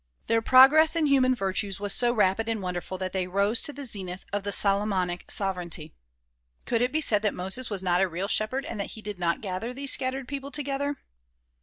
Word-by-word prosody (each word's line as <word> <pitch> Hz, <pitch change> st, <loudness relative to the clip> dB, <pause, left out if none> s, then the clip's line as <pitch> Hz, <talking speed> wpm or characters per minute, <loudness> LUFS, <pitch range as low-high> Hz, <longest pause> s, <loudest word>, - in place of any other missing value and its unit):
Their 230 Hz, 0 st, +1 dB
progress 280 Hz, +7 st, +6 dB
in 325 Hz, -2 st, +1 dB
human 260 Hz, -3 st, +3 dB
virtues 195 Hz, -2 st, -1 dB
was 205 Hz, -1 st, -1 dB
so 240 Hz, -1 st, +2 dB
rapid 220 Hz, 0 st, +1 dB
and 225 Hz, -1 st, -1 dB
wonderful 180 Hz, 0 st, -5 dB
that 185 Hz, 0 st, -5 dB
they 185 Hz, -2 st, -2 dB
rose 200 Hz, +5 st, +1 dB
to -, -, -1 dB
the 285 Hz, -1 st, -8 dB
zenith 190 Hz, -5 st, -5 dB
of 205 Hz, -, -1 dB
the 205 Hz, +1 st, -4 dB
Solomonic 195 Hz, -3 st, +1 dB
sovereignty. 180 Hz, -5 st, -2 dB, 0.7 s
Could 230 Hz, -1 st, 0 dB
it 250 Hz, +1 st, +1 dB
be 315 Hz, -, 0 dB
said 210 Hz, -8 st, +2 dB
that 210 Hz, -2 st, -1 dB
Moses 190 Hz, +7 st, -1 dB
was 200 Hz, -3 st, -3 dB
not 180 Hz, 0 st, +2 dB
a 195 Hz, -, +3 dB
real 180 Hz, +4 st, -3 dB
shepherd 255 Hz, +7 st, -1 dB
and 265 Hz, -10 st, -6 dB
that 200 Hz, -, -4 dB
he 220 Hz, -, -10 dB
did 205 Hz, -3 st, -6 dB
not 170 Hz, -1 st, -1 dB
gather 210 Hz, +5 st, -5 dB
these 275 Hz, 0 st, +2 dB
scattered 260 Hz, 0 st, 0 dB
people 280 Hz, 0 st, -6 dB
together? 285 Hz, 0 st, -2 dB
210 Hz, 210 wpm, -26 LUFS, 190-255 Hz, 0.7 s, progress